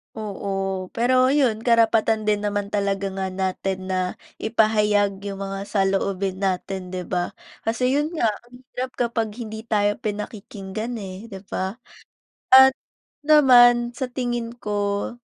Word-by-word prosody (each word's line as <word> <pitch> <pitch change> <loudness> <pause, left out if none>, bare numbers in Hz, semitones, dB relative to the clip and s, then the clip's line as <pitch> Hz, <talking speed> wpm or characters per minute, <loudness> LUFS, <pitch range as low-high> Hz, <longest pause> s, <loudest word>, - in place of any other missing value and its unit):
Oo. 195 -3 -4
Pero 255 +2 +3
iyon, 235 -7 +1
karapatan 225 -2 +3
din 210 -1 0
naman 205 -1 -2
talaga 200 -1 -1
nga 190 0 -3
natin 190 0 -3
na 185 -1 -1 0.2
ipahayag 210 -3 +2
yung 200 -1 -5
mga 195 0 -4
saloobin 195 -1 0
natin, 190 -1 -3
'di 185 - -3
ba? 175 -1 -1 0.3
Kasi 250 +4 +1
yun 300 +3 -1
nga, 270 -9 +2 0.2
ang 245 +1 -16 0.2
hirap 255 0 -3
kapag 230 -3 -1
hindi 220 -1 -7
tayo 205 -2 +1
pinakikinggan, 210 0 -5
eh, 190 +2 -8
di 195 -4 -9
ba? 190 +1 -2 0.8
At 265 0 +9 0.5
naman 245 -5 +6
sa 250 0 -4
tingin 240 -2 -2
ko, 205 +1 -2
210 Hz, 135 wpm, -23 LUFS, 195-240 Hz, 0.8 s, At